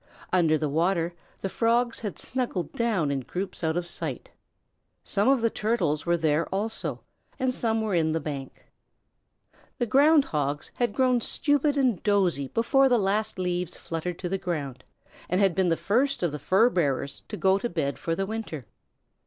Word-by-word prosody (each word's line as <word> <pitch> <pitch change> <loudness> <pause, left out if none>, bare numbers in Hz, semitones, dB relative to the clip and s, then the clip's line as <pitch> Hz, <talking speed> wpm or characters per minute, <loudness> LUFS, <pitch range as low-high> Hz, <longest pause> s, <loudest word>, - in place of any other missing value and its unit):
Under 165 -4 +4
the 155 - -1
water 170 +3 +1 0.3
the - - -1
Frogs 235 +4 +1
had 210 -4 -5
snuggled 235 - -3
down 210 -11 0
in 140 - 0
groups 185 +8 -5
out 160 +1 +1
of 175 - -1
sight. - - -5 0.7
Some 205 +4 +1
of 270 -3 +4
the 230 -1 +2
Turtles 180 -9 0
were 170 0 +3
there 160 0 +1
also, 215 +3 -3 0.4
and 260 -2 0
some 225 -2 0
were 215 -2 -1
in 160 -2 +2
the 160 - 0
bank. 140 -3 -7 1.1
The 240 - 0
Ground 285 +5 +5
Hogs 145 -1 -2
had 240 -4 -1
grown 255 -2 +3
stupid 290 +3 +1
and 250 -9 +2
dozy 185 -9 +1
before 265 - +3
the 245 - +4
last 210 +1 0
leaves 180 -1 -2
fluttered 165 +1 -4
to 180 - -4
the 195 +1 -1
ground, 140 -9 -4 0.5
and 180 - +1
had 195 -3 +4
been 185 +1 +2
the 165 - +2
first 260 +3 +1
of 170 - +1
the 150 - -5
fur 205 - +3
bearers 140 - -1
to 210 - -6
go 190 0 +3
to 240 - -2
bed 145 -5 -2
for 165 - -1
the 195 - -1
winter. 195 - -5
190 Hz, 180 wpm, -26 LUFS, 165-230 Hz, 1.1 s, Ground